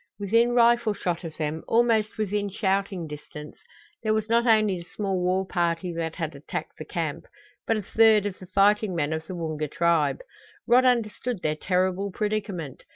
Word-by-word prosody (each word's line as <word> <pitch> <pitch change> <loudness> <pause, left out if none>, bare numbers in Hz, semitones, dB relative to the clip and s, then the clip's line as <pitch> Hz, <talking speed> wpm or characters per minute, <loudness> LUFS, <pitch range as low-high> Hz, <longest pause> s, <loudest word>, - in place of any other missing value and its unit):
Within 230 +4 +2
rifle 235 -2 +4
shot 175 -2 -3
of 160 -2 -8
them, 155 0 -3
almost 225 -2 +2
within 205 -1 -1
shouting 195 -2 -1
distance, 150 0 -10 0.4
there 215 -1 +1
was 220 0 -2
not 235 +1 +3
only 215 -5 +3
the 170 - -11
small 195 -3 -1
war 185 +1 +1
party 175 -1 -1
that 165 -1 -3
had 160 -3 -4
attacked 140 - -6
the - - -6
camp, - - -4 0.4
but 225 - +2
a 210 - -4
third 220 0 +4
of 200 -2 -4
the 185 - -11
fighting 200 +1 +3
men 155 -1 0
of 160 0 -5
the 185 - -6
Woonga 155 -3 -3
tribe! 170 - +1 0.4
Rod 250 +2 +5
understood 240 -2 0
their 155 0 0
terrible 185 +3 0
predicament. 200 - -3
195 Hz, 175 wpm, -26 LUFS, 170-215 Hz, 0.4 s, Rod